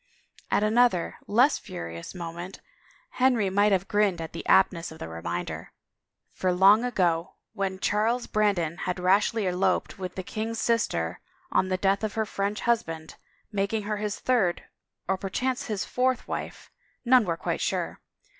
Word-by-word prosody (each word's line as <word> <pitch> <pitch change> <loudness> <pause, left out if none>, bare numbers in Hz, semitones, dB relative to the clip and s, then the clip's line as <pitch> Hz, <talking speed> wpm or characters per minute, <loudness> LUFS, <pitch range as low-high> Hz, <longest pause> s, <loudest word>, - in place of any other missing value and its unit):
At - - +2
another, 220 -4 +2
less 250 +8 +4
furious, 85 - -7
moment 175 +2 -7 0.6
Henry 240 -7 +3
might 205 +2 +3
have 195 0 +1
grinned 205 -4 +2
at 165 -1 -6
the 165 - -6
aptness 175 -3 +3
of 160 - -10
the - - -6
reminder, 85 +2 -5 0.6
for 185 - 0
long 195 +5 +6
ago, 175 -8 0 0.2
when 195 -3 -2
Charles 220 +5 +1
Brandon 190 -6 +1
had 180 0 -3
rashly 200 +4 +2
eloped 185 +2 0
with 185 -1 -5
the 185 - -4
king's 225 +4 -4
sister, 85 - 0 0.3
on 190 - +2
the 185 - +1
death 195 +2 +1
of 215 -1 -2
her 220 -1 +1
French 200 0 -2
husband, 165 -10 -1 0.4
making 205 +1 -1
her 210 +1 -2
his 210 0 -3
third, 215 -9 +1 0.4
or 190 - +1
perchance 250 +7 -2
his 210 -4 -2
fourth 255 0 0
wife - - -6 0.2
— - - -41
none 250 0 +6
were 170 -4 -2
quite - - -2
sure - - -2
195 Hz, 160 wpm, -27 LUFS, 180-220 Hz, 0.6 s, long